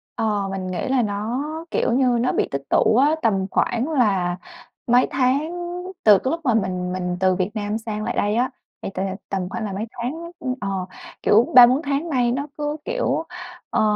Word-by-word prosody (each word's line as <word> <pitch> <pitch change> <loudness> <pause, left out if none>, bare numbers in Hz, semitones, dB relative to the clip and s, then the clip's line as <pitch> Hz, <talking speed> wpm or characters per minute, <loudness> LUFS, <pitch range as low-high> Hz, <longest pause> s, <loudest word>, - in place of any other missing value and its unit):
Ờ, 210 -3 0
mình 190 -1 -4
nghĩ 185 -1 -3
là 260 -1 +2
nó, 215 +5 -2 0.3
kiểu - - +1
như, 250 -1 +3
nó 250 - +1
bị - - 0
tích 140 - -2
tụ - - +3
á. 285 +5 +4
Tầm 195 -4 +1
khoảng 245 +6 0
là 195 - +1 0.5
mấy 245 +1 +4
tháng 270 +5 +1 0.5
từ 210 -2 +8
cái 260 - -2
lúc 330 - -1
mà 240 - +3
mình 185 -4 -1
mình 180 -1 -2
từ 185 -1 +3
Việt 185 +2 -1
Nam 210 0 -2
sang 215 -1 -5
lại - - -2
đây 205 +1 +1
á, 250 +2 +1 0.3
thì - - -4
t - - -19 0.3
tầm 185 -2 -2
khoảng 225 - -4
là 200 - -4
mấy 205 +4 -3
tháng, 310 +8 -5
ừm, 255 -7 -2
ờ, 200 - -2 0.5
kiểu, 225 +4 +4
3-4 250 +3 +8
tháng 285 +3 -2
nay 250 -5 +2
nó 280 +4 -2
cứ, 295 0 -2
kiểu, - - -1 0.5
ờ, - - +1
230 Hz, 200 wpm, -22 LUFS, 195-260 Hz, 0.5 s, từ